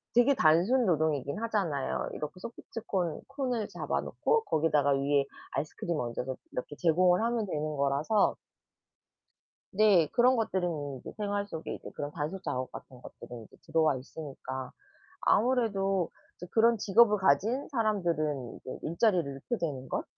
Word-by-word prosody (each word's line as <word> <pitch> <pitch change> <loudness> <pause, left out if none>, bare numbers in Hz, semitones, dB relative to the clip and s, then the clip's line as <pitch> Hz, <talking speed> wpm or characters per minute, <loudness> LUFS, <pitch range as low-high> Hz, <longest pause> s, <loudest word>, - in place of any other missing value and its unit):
되게 245 +4 +6
단순 185 +11 +4
노동이긴 150 -5 +1
하잖아요. 185 -12 -1
이렇게 150 - -5
소프트 230 +2 -8
콘 175 -5 -1
콘을 255 -6 -2
잡아 - - -2
놓고 460 -1 0
거기다가 150 - +2
위에 140 +1 +2 0.3
아이스크림 155 +4 -3
얹어서 125 +2 -3 0.2
이렇게 125 +4 -5
제공을 180 +3 +4
하면 230 -1 0
되는 155 -4 -3
거라서 140 +9 +2 1.4
네. 195 -5 +5
그런 250 +2 +4
것들은 170 - -2
이제 - - -9
생활 205 -1 -2
속에 160 -5 -5
이제 - - -9
그런 145 0 -4
단순 155 +5 -4
작업 130 -4 -3
같은 125 -2 -11
것들이 120 -2 -10
이제 - - -20
들어와 160 -3 +2
있으니까 130 -1 -7 0.5
아무래도 200 -7 +2 0.3
이제 180 - -9
그런 230 +1 +4
직업을 210 +1 +5
가진 200 - +2
사람들은 170 - -1
이제 130 - -7
일자리를 175 +1 +2
잃게 135 - -4
되는 140 -6 -3
것이 - - -2
170 Hz, 340 characters per minute, -30 LUFS, 145-215 Hz, 1.4 s, 되게